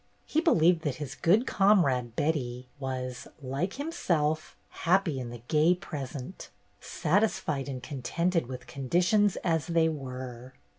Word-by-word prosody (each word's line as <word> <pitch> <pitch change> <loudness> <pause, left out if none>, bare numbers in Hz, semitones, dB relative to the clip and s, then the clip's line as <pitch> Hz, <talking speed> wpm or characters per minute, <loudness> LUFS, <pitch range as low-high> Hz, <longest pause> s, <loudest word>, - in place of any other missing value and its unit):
He 315 - +1
believed 175 - +4
that 145 -4 -2
his 145 -3 -6
good 205 - +3
comrade, 140 - +3
Betty, 125 -5 -1
was, 130 -2 -4
like 140 +7 -2
himself, 160 - -1
happy 175 -5 +1
in 125 -2 -5
the 120 -1 -9
gay 160 +3 +4
present, 145 -3 -7 0.3
satisfied 160 -6 0
and 130 -2 -5
contented 165 +4 -1
with 130 0 -7
conditions 180 - +2
as 165 -2 +1
they 165 -1 +3
were. 130 -3 -7
150 Hz, 130 wpm, -29 LUFS, 130-175 Hz, 0.3 s, believed